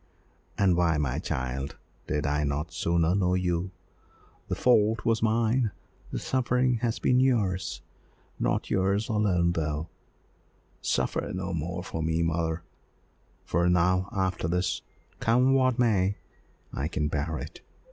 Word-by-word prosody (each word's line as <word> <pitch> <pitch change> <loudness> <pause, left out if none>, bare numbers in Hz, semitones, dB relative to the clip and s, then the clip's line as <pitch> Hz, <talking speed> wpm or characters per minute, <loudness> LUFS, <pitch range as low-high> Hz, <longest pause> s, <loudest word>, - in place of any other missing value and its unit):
"And 95 -3 +4
why, 85 -3 +2
my 70 -4 -1
child, 65 +1 -3 0.3
did 75 -1 -1
I 75 +1 +1
not 75 +4 -2
sooner 85 0 +1
know 90 -2 +2
you? 90 0 0 0.8
The - - -1
fault 110 -2 +3
was 115 -1 +2
mine, 115 +1 +2 0.4
the - - -4
suffering 125 -1 +1
has 115 0 -1
been 125 0 +3
yours, 100 -9 +1 0.6
not - - 0
yours 100 +4 +1
alone, 95 -6 +2
though." 80 -1 -2 0.9
"Suffer - - -1
no 95 0 -3
more 85 +3 -3
for 80 - -4
me, 80 +1 +1
mother, 80 0 -1 0.8
for 85 +1 +2
now, 90 +2 +2
after 95 -4 -1
this, 90 +1 0 0.4
come 125 +4 +3
what 130 -2 +3
may, 100 -5 +2 0.6
I 70 - -2
can 75 -2 -1
bear 75 +2 -2
it. - - -8
90 Hz, 135 wpm, -28 LUFS, 80-110 Hz, 0.9 s, And